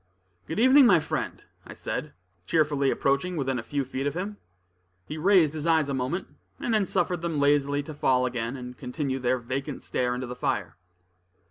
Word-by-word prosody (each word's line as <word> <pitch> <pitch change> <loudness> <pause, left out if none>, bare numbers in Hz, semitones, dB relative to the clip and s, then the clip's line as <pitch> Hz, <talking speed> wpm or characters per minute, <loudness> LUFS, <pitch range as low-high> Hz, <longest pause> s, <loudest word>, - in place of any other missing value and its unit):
"Good 160 - -4
evening, 260 +3 +7
my 180 -7 +6
friend," 150 - -4 0.2
I - - -11
said, - - -4 0.3
cheerfully, 150 -4 +2
approaching 140 +8 0
within 135 -3 -1
a - - -3
few 140 +3 -2
feet 135 +2 -3
of 145 - -2
him. 200 +4 -4 0.7
He 150 - -6
raised 175 -4 +4
his 155 +1 -3
eyes 160 -3 +3
a - - -1
moment, 130 +8 -2 0.3
and 235 - -1
then 210 -3 +2
suffered 175 -2 0
them 165 -3 -1
lazily 145 0 +2
to 155 - -8
fall 130 -3 +2
again, 120 +1 -3
and 125 0 -8
continue 135 +1 -3
their 125 0 +1
vacant 130 +4 -4
stare 125 -1 -1
into 125 +1 -4
the 125 0 -6
fire. 125 - -2
145 Hz, 190 wpm, -27 LUFS, 130-165 Hz, 0.7 s, evening